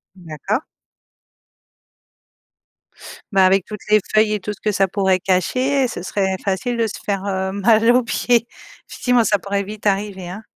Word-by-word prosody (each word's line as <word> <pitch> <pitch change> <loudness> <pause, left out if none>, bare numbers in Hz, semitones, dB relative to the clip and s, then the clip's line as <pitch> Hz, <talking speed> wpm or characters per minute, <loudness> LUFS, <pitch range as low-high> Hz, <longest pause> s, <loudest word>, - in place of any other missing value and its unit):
D'accord. 180 - -4 2.7
Bah, 190 -1 +5
avec 190 0 +3
toutes 210 -1 -8
les 215 0 +6
feuilles 215 0 +3
et 210 - -2
tout 210 - -4
ce 205 - -13
que 210 - 0
ça 195 -1 +2
pourrait 190 -1 +1
cacher, 255 +10 +1
ce 200 -7 -6
serait 190 0 -1
facile 205 +5 -1
de 225 -1 0
se - - -7
faire, 200 -1 -2
heu, 190 -1 -2
mal 220 +3 +3
aux 250 +1 +3
pieds. 235 +1 +1 0.4
Effectivement, 245 -2 +1
ça 205 -1 +2
pourrait 200 +2 -2
vite 210 +1 -9
arriver, 195 -2 -1
hein. 200 +5 -8
200 Hz, 165 wpm, -20 LUFS, 190-220 Hz, 2.7 s, les